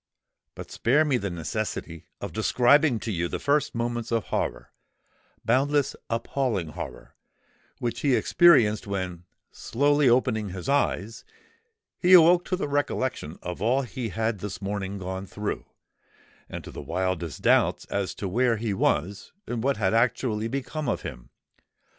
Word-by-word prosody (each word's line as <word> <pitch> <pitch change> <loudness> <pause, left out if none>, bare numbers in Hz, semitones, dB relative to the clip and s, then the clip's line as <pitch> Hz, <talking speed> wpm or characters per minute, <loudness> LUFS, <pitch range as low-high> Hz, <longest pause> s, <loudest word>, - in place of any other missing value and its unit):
But - - -9
spare 145 +7 +2
me 140 -4 +2
the 100 -4 -3
necessity 85 -1 -4
of - - -6
describing 120 +5 +3
to 115 - -3
you 85 -3 -1
the - - -3
first 145 -2 0
moments 120 0 -2
of 115 -2 +1
horror—boundless, 140 +3 -2
appalling 115 - -1
horror—which 115 +8 -9
he 140 -3 +2
experienced, 120 -14 +4
when, 90 -3 -4 0.3
slowly 145 +2 +2
opening 120 -4 +2
his 90 -1 -7
eyes, 115 -6 0 0.8
he 180 0 +4
awoke 175 0 +7
to 185 - -1
the 185 - -3
recollection 130 - -2
of 90 0 -5
all 125 +6 +2
he 120 0 -5
had 110 +1 -2
this 95 -2 -6
morning 100 0 -4
gone 95 +1 -5
through, 105 +2 -4 0.8
and - - -7
to - - -9
the - - -7
wildest 90 -4 -3
doubts - - +3
as 100 -2 -3
to 100 - -4
where 120 +4 +2
he 110 -1 -2
was 100 +1 -1
and 120 -2 -3
what 140 +1 +1
had 95 -2 +1
actually 115 -1 +1
become 140 +4 -3
of - - -2
him! - - -8
115 Hz, 145 wpm, -26 LUFS, 95-135 Hz, 0.8 s, awoke